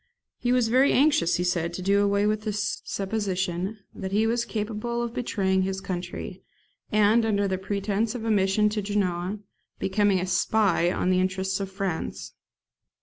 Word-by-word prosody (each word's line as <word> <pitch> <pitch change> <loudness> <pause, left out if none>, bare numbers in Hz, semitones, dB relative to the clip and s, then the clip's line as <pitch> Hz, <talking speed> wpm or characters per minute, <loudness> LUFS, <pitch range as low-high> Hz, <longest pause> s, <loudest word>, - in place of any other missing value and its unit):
He 245 - 0
was 250 -3 +3
very 260 +4 +4
anxious, 290 - +3
he 180 - 0
said, 175 -1 0
to 185 - -5
do 200 +2 +3
away 200 0 +2
with 215 0 +1
the 215 0 -2
supposition 195 -2 -2 0.2
that 190 - -6
he 210 +3 +2
was 235 +1 0
capable 230 +2 -3
of 235 -1 -4
betraying 190 -6 0
his 190 0 -2
country, 180 0 -5 0.5
and, 215 +2 +4
under 205 -2 +1
the 190 -1 -2
pretence 205 +3 -1
of 225 -2 -5
a 225 - +1
mission 200 +1 +3
to 210 0 -2
Genoa, 195 -1 -1 0.4
becoming 200 0 +2
a 180 - -1
SPY 185 -1 +2
on 185 - 0
the 185 - +3
interests 190 +1 -1
of 195 -1 -4
France. 190 -4 -4
200 Hz, 170 wpm, -26 LUFS, 190-215 Hz, 0.5 s, very